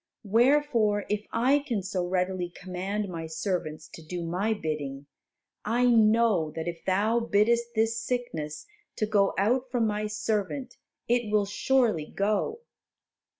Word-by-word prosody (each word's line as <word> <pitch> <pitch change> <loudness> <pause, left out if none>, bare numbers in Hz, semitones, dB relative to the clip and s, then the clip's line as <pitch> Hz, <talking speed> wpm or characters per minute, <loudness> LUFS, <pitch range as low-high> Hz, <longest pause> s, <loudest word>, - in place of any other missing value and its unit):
Wherefore, 230 -2 +3
if 210 0 -2
I 255 +5 +3
can 240 -9 -3
so 185 -1 -2
readily 180 -1 -1
command 190 +3 -4
my 165 -3 -5
servants 160 -2 -3
to - - -11
do 170 +2 -5
my 185 +6 -1
bidding, 150 -8 -3 0.6
I 235 +4 +1
know 220 -7 +4
that 160 +1 -4
if 170 -1 -5
Thou 210 +5 +2
biddest 235 +2 +2
this 225 +1 +1
sickness 165 -13 -3 0.3
to 215 - 0
go 205 -2 +2
out 250 +6 +1
from 245 -2 +1
my 210 0 -1
servant 210 +4 -2 0.3
it 240 -3 +1
will 210 -1 +3
surely 215 - +1
go." 215 - -1
210 Hz, 140 wpm, -27 LUFS, 180-235 Hz, 0.6 s, know